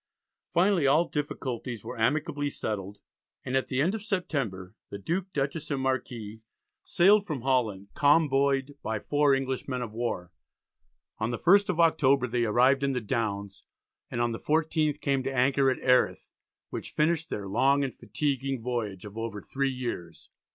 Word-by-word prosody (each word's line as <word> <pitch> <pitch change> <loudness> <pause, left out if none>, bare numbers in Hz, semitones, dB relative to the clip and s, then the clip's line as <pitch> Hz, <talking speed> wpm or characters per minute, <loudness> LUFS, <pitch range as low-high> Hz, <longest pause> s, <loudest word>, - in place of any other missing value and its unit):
Finally 175 -4 +3
all 155 +5 +4
difficulties 125 -6 -4
were - - -6
amicably 145 +5 0
settled, 100 -6 -4 0.5
and 125 - -2
at 130 - +1
the 130 - -1
end 170 +8 +2
of 220 - -4
September 140 - -3 0.2
the 100 - -6
Duke, 180 - -3
Dutchess, 140 +1 -2
and 140 - -1
Marquis 120 -5 -3 0.4
sailed 200 +3 +4
from 150 -6 -3
Holland, 115 -7 0
convoyed 140 -2 +3
by 110 0 -2
four 145 +5 +2
English 135 -1 -3
men 130 -2 -2
of 110 -3 -7
war. 110 -7 -3 0.9
On 110 +1 -1
the 120 - -2
1st 200 - +4
of 175 -2 -1
October 140 -5 +4
they 120 -1 0
arrived 125 +5 +4
in 140 -1 +1
the 125 - 0
Downs, 100 -4 -3 0.5
and 120 - -4
on 120 0 +1
the 115 - -5
14th 155 -1 0
came 140 -2 +1
to 135 - -2
an 135 - -5
anchor 135 +1 +3
at 130 - 0
Erith, 125 -1 +2 0.4
which - - -5
finished 165 +2 +1
their 100 -1 -4
"long 135 +7 +3
and 135 -3 -3
fatiguing 135 +2 -2
voyage" 110 -6 -3
of 105 +2 -8
over 115 -2 -4
three 135 +5 -2
years. 120 -11 -6
135 Hz, 170 wpm, -28 LUFS, 115-145 Hz, 0.9 s, all